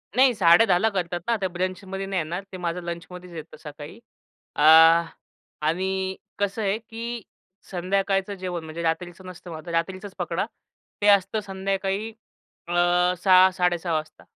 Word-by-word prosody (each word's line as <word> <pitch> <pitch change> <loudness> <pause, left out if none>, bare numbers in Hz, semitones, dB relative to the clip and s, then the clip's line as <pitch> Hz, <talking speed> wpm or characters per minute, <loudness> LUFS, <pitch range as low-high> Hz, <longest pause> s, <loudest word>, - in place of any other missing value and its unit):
नाही, 260 0 +5
10:30 180 +1 +5
ला 225 - +3
करतात 175 -2 -2
ना, 235 - +2
ते 190 - +1
ब्रंचमध्ये 185 +2 -4
नाही 195 -1 -1
येणार. 175 +5 -4
ते 185 - -7
माझं 175 0 -3
लंचमध्येच 175 +1 -7
येतं 160 0 -9
सकाळी. 150 +6 -10 0.6
अ, - - -2 1.1
आणि 190 +2 -1 0.2
कसं 205 +2 -1
आहे 200 0 +1
की 230 +1 -6 0.5
संध्याकाळचं 195 +2 0
जेवण 180 -3 -5
म्हणजे 160 +2 -6
रात्रीचं 175 +2 -3
नसतं 180 -1 -10
मग 160 - -6
आता 170 +2 -8
रात्रीचाच 185 +4 -3
पकडा, - - -1 0.6
ते 205 - +2
असतं 200 +1 +4
संध्याकाळी 195 +2 -2 0.6
अ, - - -3 0.5
6:00-06:30 185 -2 +4
वाजता. 155 0 -4
185 Hz, 140 wpm, -24 LUFS, 170-195 Hz, 1.1 s, नाही